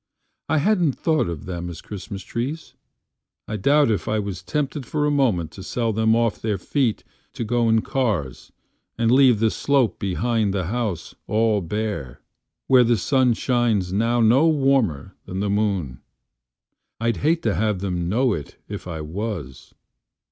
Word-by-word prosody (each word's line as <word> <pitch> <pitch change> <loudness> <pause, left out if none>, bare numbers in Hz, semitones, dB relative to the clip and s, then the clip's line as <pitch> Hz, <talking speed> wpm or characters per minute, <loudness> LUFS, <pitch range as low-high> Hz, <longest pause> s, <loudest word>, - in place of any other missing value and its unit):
I 160 - +2
hadn't 175 -2 +2
thought 155 - 0
of 85 -4 -6
them 90 -1 -5
as 85 -2 -8
Christmas 100 0 -8
Trees.I 125 -3 -8
doubt 140 +4 +3
if 105 - -2
I 110 - +1
was 100 -3 -4
tempted 150 -1 -2
for 150 +5 -1
a 150 - +2
momentTo 100 - 0
sell 115 +2 -1
them 110 +1 +3
off 115 -2 0
their 105 -3 -1
feet 120 +4 -1 0.3
to - - -4
go 115 +1 +1
in 110 0 +3
carsAnd 100 - -2 0.6
leave 130 -4 +5
the 110 0 +2
slope 140 -5 +1
behind 105 +1 0
the 95 -3 -1
house 105 -4 -3
all 110 -1 +2
bare, 90 - -4 0.5
Where 130 -1 +6
the 120 -1 +2
sun 130 +3 +2
shines 115 -8 0
now 115 +4 +2
no 125 +8 +5
warmer 135 - +1
than 95 - -4
the 100 0 0
moon. 100 - -1 1.0
I'd 115 0 0
hate 165 +3 +1
to 110 - +1
have 105 -1 0
them 90 -3 -2
know 120 +3 +2
it 75 -6 -7
if 100 -2 -7
I 80 -3 -5
was. 80 - -6
110 Hz, 155 wpm, -23 LUFS, 95-125 Hz, 1.0 s, Where